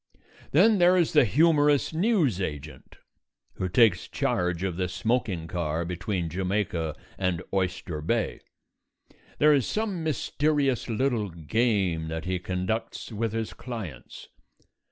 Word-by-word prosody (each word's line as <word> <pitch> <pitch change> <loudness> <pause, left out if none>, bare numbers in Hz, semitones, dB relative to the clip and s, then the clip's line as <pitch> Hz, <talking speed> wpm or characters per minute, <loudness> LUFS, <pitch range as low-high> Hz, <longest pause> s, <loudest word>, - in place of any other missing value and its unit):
Then 200 +7 +5
there 180 +1 +5
is 170 -3 +2
the 150 -5 +6
humorous 150 - +3
news 165 - +2
agent 75 -3 -6 0.6
who 95 - -2
takes 100 -2 +4
charge 90 0 -1
of 95 -3 -1
the 90 0 -1
smoking 100 -3 -1
car 85 -1 -2
between 90 0 -3
Jamaica 90 -3 -2 0.2
and 90 -2 -1
Oyster 90 -4 -2
Bay. 115 +9 -1 1.0
There 150 0 +5
is 135 -5 +2
some 210 -6 -2
mysterious 145 -3 0
little 115 -3 0
game 90 -1 0
that 80 0 -4
he 90 0 -1
conducts 95 +7 -3
with 110 0 -2
his 115 -1 -3
clients. 110 - -8
105 Hz, 125 wpm, -27 LUFS, 90-140 Hz, 1.0 s, the